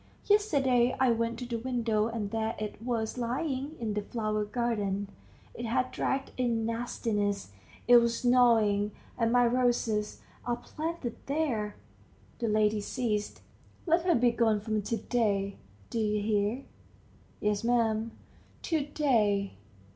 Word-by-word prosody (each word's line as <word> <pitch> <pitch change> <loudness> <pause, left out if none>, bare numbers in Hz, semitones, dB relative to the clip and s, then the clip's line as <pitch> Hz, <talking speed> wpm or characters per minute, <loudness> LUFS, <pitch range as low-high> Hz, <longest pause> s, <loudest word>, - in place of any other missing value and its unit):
Yesterday 270 - +3
I 260 -2 +4
went 230 0 0
to 250 - -5
the 235 -1 -3
window, 230 -3 0
and 225 -3 -4
there 225 0 -1
it 215 0 -5
was 230 0 -2
lying 265 +4 -2
in 220 -3 -2
the 210 - -1
flower 215 -1 -2
garden; 205 -4 -1 0.4
it 235 - -6
had 255 +3 0
dragged 270 0 -1
in 235 -3 0
nastiness 215 - -2 0.4
it 245 0 +9
was 235 +1 +1
gnawing, 220 -5 +4 0.2
and 230 -1 +1
my 245 0 +5
roses 235 -3 +1 0.2
are 240 -1 0
planted 305 -1 -5
there.. 255 -9 -1 0.3
." - - -30
The 235 - -1
lady 215 0 +2
ceased. 210 -2 -2 0.4
"Let 335 0 +3
her 350 - +4
be 240 0 +4
gone 225 -3 +2
from 215 0 -1
to 225 +3 -2
day... 200 -3 0 0.3
do 230 - -1
you 210 -1 +1
hear?" 210 +4 0 0.8
"Yes, 210 0 0
'm." 230 -2 +1 0.5
"To 320 -4 0
day. 220 -9 +1
230 Hz, 140 wpm, -30 LUFS, 210-245 Hz, 0.8 s, it